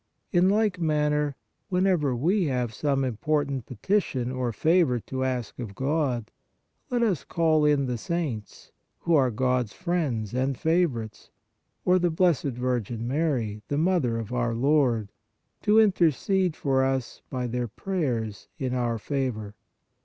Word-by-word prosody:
In 180 0 +4
like 205 -2 +2
manner, 150 -3 +1 0.3
whenever 180 -8 +2
we 175 - +2
have 125 -5 -1
some 135 +2 0
important 135 +1 -1
petition 130 - -1
or 130 -2 -1
favor 155 - +2
to 130 +5 -4
ask 125 -4 -3
of 110 -5 -6
God, 135 -5 -1 0.6
let 245 -2 +1
us 195 -10 +1
call 160 -2 +2
in 145 -2 +3
the 125 -2 -2
saints, 150 -9 -4 0.3
who 170 - +1
are 135 -5 +5
God 125 +1 +1
s 105 - -16
friends 150 - -2
and 130 +1 0
favorites, 145 -11 0 0.6
or 180 +1 +4
the 175 0 +2
Blessed 160 -7 +1
Virgin 120 -2 -2
Mary, 125 -7 -1
"the 145 - -1
Mother 155 -8 +2
of 115 +1 -5
our 120 -2 0
Lord," 120 -5 +2 0.5
to 210 +1 +4
intercede 185 -2 +2
for 135 -2 +1
us 130 -2 -2
by 125 -1 -3
their 125 0 -2
prayers 120 - -3
in 130 -2 -2
our 120 -2 0
favor. 110 -5 -3
135 Hz, 145 wpm, -26 LUFS, 120-165 Hz, 0.6 s, are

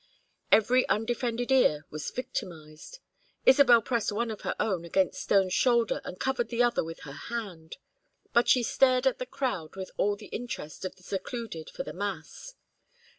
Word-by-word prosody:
Every 250 +4 +4
undefended 240 +2 -1
ear 150 - +4
was 155 0 -4
victimized. 170 - -7 0.5
Isabel 260 -4 +7
pressed 235 -3 0
one 230 +2 -1
of 215 - -7
her - - -2
own 190 -6 0
against 185 +2 0
Stone's 190 -2 +2
shoulder 235 -2 +2
and 180 - -8
covered 260 -3 -1
the 240 0 +2
other 240 -1 +2
with 165 0 -8
her 145 - -9
hand. 180 - -7 0.6
But 235 - +4
she 250 - +5
stared 255 +1 +3
at 265 - +2
the 255 - -4
crowd 195 - -3
with 190 -1 -6
all 205 0 +2
the 205 +1 -12
interest 205 -9 -6
of 185 - -5
the 185 - -22
secluded 195 -3 -5
for - - -5
the - - -7
mass. 200 - -6
225 Hz, 170 wpm, -28 LUFS, 180-245 Hz, 0.6 s, Isabel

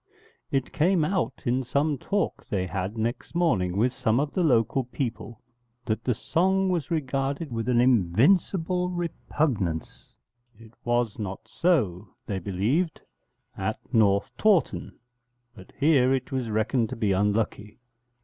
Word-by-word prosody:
_' - - -54 0.5
It 135 -2 -1
came 165 0 +3
out 185 +2 -2
in 125 +1 +1
some 140 +3 0
talk 200 +2 -2
they 95 -3 -1
had 95 +4 -4
next 115 +8 -3
morning 100 - +1
with 120 +4 +2
some 115 +1 +1
of 145 +1 -1
the 185 - 0
local 130 -2 +2
people 120 -3 -5 0.4
that 110 0 -2
that 125 - +2
song 190 - +1
was 170 -5 -1
regarded 140 -1 -2
with 115 +1 -2
an 120 -1 +3
invincible 160 - +3
repugnance; 150 - -2 0.5
it 115 0 -16
was 120 -3 0
not 100 -2 -4
so, 110 - +1 0.2
they 100 -2 -3
believed, 110 - -1 0.6
at - - -2 0.2
North 100 -3 +3
Tawton, 210 -6 +1 0.6
but 95 -5 -14
here 135 -3 +4
it 130 -1 -5
was 130 -3 -2
reckoned 110 +2 0
to - - -5
be 110 -3 0
unlucky. 105 +1 0
125 Hz, 140 wpm, -26 LUFS, 105-155 Hz, 0.6 s, here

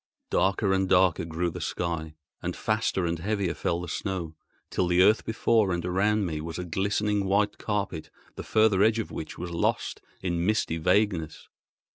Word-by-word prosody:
Darker 95 +1 +2
and 95 -1 +1
darker 90 -3 +4
grew 85 +1 -2
the - - -7
sky, 80 -3 -3 0.3
and - - -3
faster 110 -4 0
and 85 -1 -1
heavier 100 -1 -1
fell 85 0 -1
the 90 - -6
snow, 85 -2 -3 0.4
till 90 - +1
the 90 +1 +4
earth 110 +3 +4
before 110 -2 +2
and 85 -1 -2
around 100 +3 +1
me 80 -3 -3
was 80 +1 -6
a 90 - -3
glistening 100 +3 0
white 105 +2 +1
carpet 100 -6 -3 0.3
the - - -6
further 110 -3 +3
edge 110 +2 +4
of 110 - -3
which 80 - -6
was 85 0 -5
lost 85 - -1 0.2
in 85 -2 -1
misty 100 -4 +1
vagueness. 90 -2 0
95 Hz, 175 wpm, -27 LUFS, 85-105 Hz, 0.4 s, darker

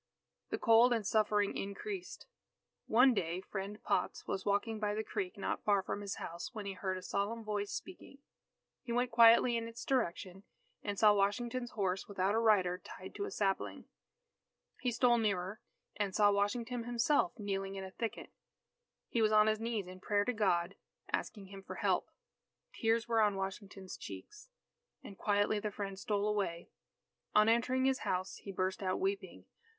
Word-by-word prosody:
The - - -1
cold 235 +1 +6
and 225 -3 -1
suffering 210 -1 +2
increased. 360 - -5 0.6
One 250 +4 +6
day 175 -4 -1
Friend 200 +2 -6
Potts - - -1
was 190 - -3
walking 210 +2 0
by 210 -1 -1
the 220 - -1
creek 370 - -4
not - - -3
far 200 -2 +3
from 205 - -4
his 200 -1 -4
house, 170 +1 -6
when 210 -2 -5
he 200 - -3
heard 185 0 -3
a 185 - -8
solemn 205 +4 -2
voice 205 -1 -2
speaking. 360 -6 -8 0.6
He 235 - -7
went 245 +1 +1
quietly 235 +1 +7
in 230 0 -2
its 230 0 -8
direction, 190 -7 -1 0.4
and 205 -1 -3
saw 210 +1 +6
Washington's 240 +5 0
horse 190 -3 -1
without 195 0 0
a 225 - +3
rider 190 -5 +3
tied 185 - -10
to 405 - -3
a - - -4
sapling. 195 - -1 0.9
He 250 - 0
stole 240 0 +4
nearer, 200 -2 -1 0.3
and 200 -2 -2
saw 205 -1 +5
Washington 230 +4 -1
himself, 240 +5 +2
kneeling 195 -2 -3
in 195 - -5
a 190 - -8
thicket. 230 +2 -5 0.8
He 235 - 0
was 215 -1 +4
on 215 0 +6
his 215 0 +2
knees 225 -3 -2
in 185 +1 -10
prayer 205 +1 +1
to 250 - 0
God 190 -4 +1 0.4
asking 195 -3 -3
Him 195 0 -9
for - - -8
help. - - 0 0.6
Tears 225 +1 +1
were 230 -1 +3
on 210 -2 +3
Washington's 195 0 -6
cheeks. 420 +4 -10 0.5
And 200 - -9
quietly 205 +2 +1
the 210 0 -2
Friend 195 -1 -5
stole 205 0 0
away. 195 -5 -2 0.7
On 215 0 +6
entering 250 +3 +2
his 265 -1 +2
house, 185 +1 -2
he 200 - -8
burst 185 +1 -1
out 185 -1 -1
weeping. 390 +1 -3
210 Hz, 175 wpm, -34 LUFS, 195-230 Hz, 0.9 s, quietly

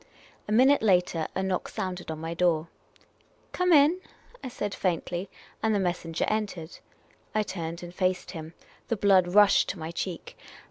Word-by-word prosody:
A - - -4
minute 260 +6 +5
later, 180 -6 +2
a 190 - -1
knock 190 -1 -1
sounded 180 -2 -5
on 160 - -4
my 165 +1 -5
door. 165 -2 +1 0.4
" - - -36
Come 360 0 +1
ill! 305 +2 +6 0.2
" - - -24
I - - -4
said, 205 -4 -4
faintly; 180 +1 -2 0.3
and 220 -1 +2
the - - +2
messenger 175 -3 -1
entered. 200 -6 -3 0.6
I 215 - +3
turned 170 -3 -5
and 175 0 -8
faced 185 0 -1
him. 160 -1 -8 0.3
The 230 - -1
l)lood 190 -2 +3
rushed 205 -1 +6
to - - -4
my 160 0 -5
cheek. 170 0 -5
185 Hz, 175 wpm, -27 LUFS, 170-210 Hz, 0.6 s, ill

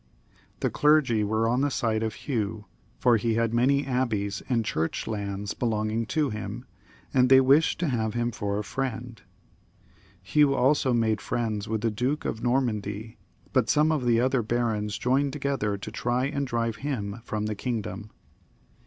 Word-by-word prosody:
The - - +1
clergy 150 -8 +3
were 110 +2 +1
on 125 +3 +1
the 145 - +2
side 115 -4 0
of 110 -1 -2
Hugh, 110 -5 -3 0.3
for 120 -2 +4
he 115 +1 0
had 115 0 +1
many 140 +4 +3
abbeys 110 -6 -1
and 115 -3 +1
church 80 -5 -2
lands 100 -2 -3
belonging 110 -1 -1
to 150 -1 0
him, 105 0 -6 0.5
and 125 -1 +4
they 130 0 +8
wished 140 +5 +4
to 175 - +1
have 110 -5 -1
him 120 0 0
for 100 -2 -2
a 105 - -2
friend. 120 -2 -4 1.0
Hugh 140 +8 +3
also 135 0 +3
made 115 -2 +1
friends 110 -3 -2
with 110 -1 -2
the 115 0 +1
Duke 125 +8 -1
of 110 - -3
Normandy, 110 -4 -1 0.3
but - - +2
some 155 +1 +4
of 150 -5 0
the 115 -1 +3
other 130 +1 +2
barons 110 -2 -1
joined 135 +3 +1
together 135 -8 -1
to 105 +2 -7
try 120 +3 0
and 140 -1 -2
drive 115 -2 -1
him 115 -6 -4
from 105 -2 -3
the 110 - -1
kingdom. 110 -2 -4
115 Hz, 170 wpm, -27 LUFS, 110-130 Hz, 1.0 s, they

